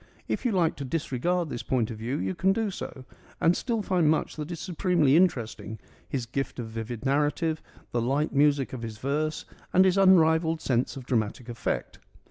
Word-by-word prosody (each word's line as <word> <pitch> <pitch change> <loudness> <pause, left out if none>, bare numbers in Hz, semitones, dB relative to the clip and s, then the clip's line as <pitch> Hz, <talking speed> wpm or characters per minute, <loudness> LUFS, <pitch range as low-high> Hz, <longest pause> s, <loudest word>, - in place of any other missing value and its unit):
If - - -2
you 245 - +3
like 175 -5 +2
to 140 - -4
disregard 165 +4 -1
this 120 - -3
point 120 -3 0
of 110 - -7
view 120 +5 -2
you 95 +1 -2
can 190 - +2
do 220 -1 -1
so, 130 -7 -7 0.3
and 170 +2 +4
still 230 -4 -1
find 180 -5 +2
much 160 - 0
that 150 0 -5
is 170 -2 -5
supremely 170 -5 +2
interesting 115 - +1 0.2
— - - -30
his 130 -4 -2
gift 135 +4 -3
of 120 -3 -5
vivid 115 +2 -6
narrative, 150 +3 +1 0.3
the 120 - 0
light 140 +6 0
music 140 -2 +3
of 125 - -5
his 115 -2 -6
verse, 150 +5 -2 0.3
and 185 +1 +5
his 190 +1 +3
unrivalled 160 -3 +5
sense 130 -2 0
of 130 - -8
dramatic 115 0 -1
effect. 120 - -3
145 Hz, 195 wpm, -27 LUFS, 120-170 Hz, 0.3 s, and